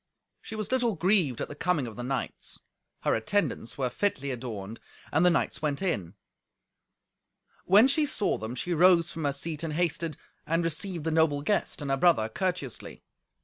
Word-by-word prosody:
She 220 Hz, -, -7 dB
was 215 Hz, +1 st, -4 dB
little 245 Hz, -5 st, +2 dB
grieved 175 Hz, -, +2 dB
at -, -, -2 dB
the -, -, -7 dB
coming 155 Hz, -2 st, 0 dB
of 115 Hz, -3 st, -7 dB
the 120 Hz, -, -6 dB
knights. 125 Hz, -1 st, -4 dB, 0.4 s
Her -, -, +2 dB
attendants 140 Hz, -, -1 dB
were 130 Hz, -3 st, -1 dB
fitly 140 Hz, -6 st, -1 dB
adorned, 115 Hz, -4 st, -6 dB, 0.3 s
and 160 Hz, +3 st, +3 dB
the 180 Hz, -, +6 dB
knights 170 Hz, -, 0 dB
went 145 Hz, -2 st, -1 dB
in. 100 Hz, -, -2 dB, 1.5 s
When 205 Hz, +7 st, +7 dB
she 295 Hz, +2 st, +2 dB
saw 210 Hz, -, 0 dB
them, 110 Hz, +3 st, -5 dB
she 175 Hz, +7 st, -2 dB
rose 175 Hz, 0 st, +5 dB
from 160 Hz, -2 st, -4 dB
her 140 Hz, -, +2 dB
seat, 155 Hz, +2 st, -4 dB
and 165 Hz, -2 st, -3 dB
hasted, 165 Hz, -2 st, -1 dB, 0.3 s
and 165 Hz, +1 st, +1 dB
received 165 Hz, +1 st, -3 dB
the 160 Hz, -, -1 dB
noble 155 Hz, -3 st, +2 dB
guest 205 Hz, -4 st, 0 dB
and 140 Hz, -, -2 dB
her 135 Hz, -, +2 dB
brother 135 Hz, -9 st, +4 dB
courteously. 175 Hz, -, -4 dB
160 Hz, 180 wpm, -28 LUFS, 135-180 Hz, 1.5 s, When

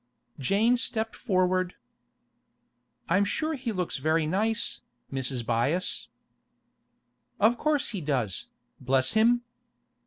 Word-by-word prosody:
Jane 210 Hz, -, +3 dB
stepped 225 Hz, -2 st, -2 dB
forward. 185 Hz, -4 st, +1 dB, 1.3 s
'I'm 185 Hz, +4 st, +3 dB
sure 310 Hz, +10 st, -1 dB
he 260 Hz, -5 st, -3 dB
looks 180 Hz, -4 st, -2 dB
very 155 Hz, +3 st, +1 dB
nice, 215 Hz, +7 st, 0 dB, 0.3 s
Mrs. 130 Hz, -2 st, -2 dB
Byass.' 135 Hz, -, 0 dB, 1.3 s
'Of 225 Hz, +4 st, +4 dB
course 300 Hz, -1 st, +1 dB
he 200 Hz, -6 st, -4 dB
does, 130 Hz, -, -1 dB, 0.3 s
bless 130 Hz, 0 st, +2 dB
him! 235 Hz, +2 st, +4 dB
185 Hz, 100 wpm, -28 LUFS, 140-225 Hz, 1.3 s, Of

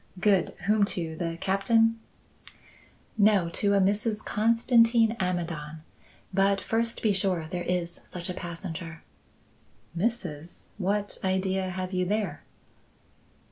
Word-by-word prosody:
"Good. 195 Hz, -1 st, +2 dB
Whom 210 Hz, +1 st, +3 dB
to? 165 Hz, -2 st, -3 dB
The 165 Hz, 0 st, -3 dB
Captain?" 225 Hz, +4 st, +2 dB, 1.2 s
"No, 200 Hz, -4 st, +4 dB
to 200 Hz, +4 st, +1 dB
a -, -, +4 dB
Mrs. 210 Hz, +3 st, 0 dB
Constantin 230 Hz, +1 st, +4 dB
Amidon. 165 Hz, -4 st, -3 dB, 0.5 s
But 195 Hz, +1 st, +3 dB
first 230 Hz, +4 st, -2 dB
be 215 Hz, -2 st, +3 dB
sure 185 Hz, -4 st, 0 dB
there 180 Hz, -2 st, -2 dB
is 175 Hz, -1 st, -2 dB
such 175 Hz, -1 st, -7 dB
a 180 Hz, -, -3 dB
passenger." 170 Hz, -2 st, -7 dB, 0.9 s
"Mrs.! 175 Hz, -6 st, -3 dB, 0.2 s
What 205 Hz, +2 st, -1 dB
idea 190 Hz, 0 st, 0 dB
have 185 Hz, +1 st, -4 dB
you 180 Hz, 0 st, +1 dB
there?" 210 Hz, +2 st, -1 dB
190 Hz, 115 wpm, -27 LUFS, 175-210 Hz, 1.2 s, No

